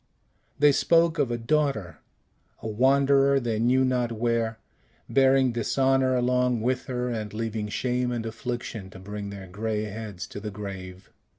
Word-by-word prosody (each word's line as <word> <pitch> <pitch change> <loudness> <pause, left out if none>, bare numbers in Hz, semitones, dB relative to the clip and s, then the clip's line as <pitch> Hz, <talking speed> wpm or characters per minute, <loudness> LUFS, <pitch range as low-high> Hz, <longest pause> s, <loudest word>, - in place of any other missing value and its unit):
They 145 - +6
spoke 165 +2 +3
of 140 -4 +2
a 120 - -1
daughter, 125 - -1 0.6
a - - -6
wanderer 135 +4 +4
they 115 -4 -2
knew 130 +3 +3
not 125 -2 0
where, 115 -1 0 0.5
bearing 135 -1 +4
dishonor 130 +3 +2
along 125 -1 +1
with 125 +2 -1
her, 125 -1 -2
and 110 -3 -4
leaving 110 -1 -3
shame 125 +2 -1
and 120 -2 -3
affliction 115 -3 -5
to 95 - -12
bring 100 +1 -6
their 100 -1 -8
gray 105 +3 -3
heads 105 -3 -6
to - - -7
the 105 +1 -5
grave. 95 -2 -8
120 Hz, 155 wpm, -26 LUFS, 105-130 Hz, 0.6 s, They